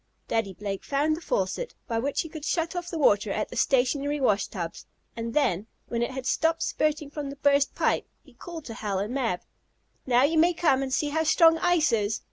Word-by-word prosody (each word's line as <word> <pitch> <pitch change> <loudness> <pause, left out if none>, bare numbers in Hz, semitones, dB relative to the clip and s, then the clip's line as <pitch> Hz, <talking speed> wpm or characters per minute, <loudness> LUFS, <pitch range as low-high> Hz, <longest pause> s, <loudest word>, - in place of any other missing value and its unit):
Daddy 225 -4 -1
Blake 195 0 -5
found 295 +3 +1
the 330 - -9
faucet, - - -2
by 230 -2 -1
which 275 +4 0
he - - -6
could 310 -1 -8
shut 330 +2 -1
off 355 0 -4
the 335 - -4
water 205 -8 +3
at 215 - -2
the - - -8
stationary 280 +3 +1
wash 215 -6 +2
tubs, 170 -4 -6 0.3
and 230 0 -5
then, 225 - +1 0.2
when 235 -1 -1
it 235 - 0
had 260 -1 -6
stopped 325 +4 +1
spurting 300 -1 -1
from 295 -2 -5
the 280 - -7
burst 280 0 +2
pipe, - - +1 0.2
he - - -20
called 335 -4 -9
to 230 - -6
Hal 210 -4 -3
and 205 +5 -2
Mab: 230 -10 -1 0.7
"Now 250 0 +4
you 315 +3 +3
may 345 +2 +4
come 300 -6 +3
and 270 -1 -3
see 295 +3 +1
how 320 +2 0
strong 325 +1 +5
ice 350 -3 +3
is. 215 -1 0
280 Hz, 220 wpm, -27 LUFS, 230-315 Hz, 0.7 s, strong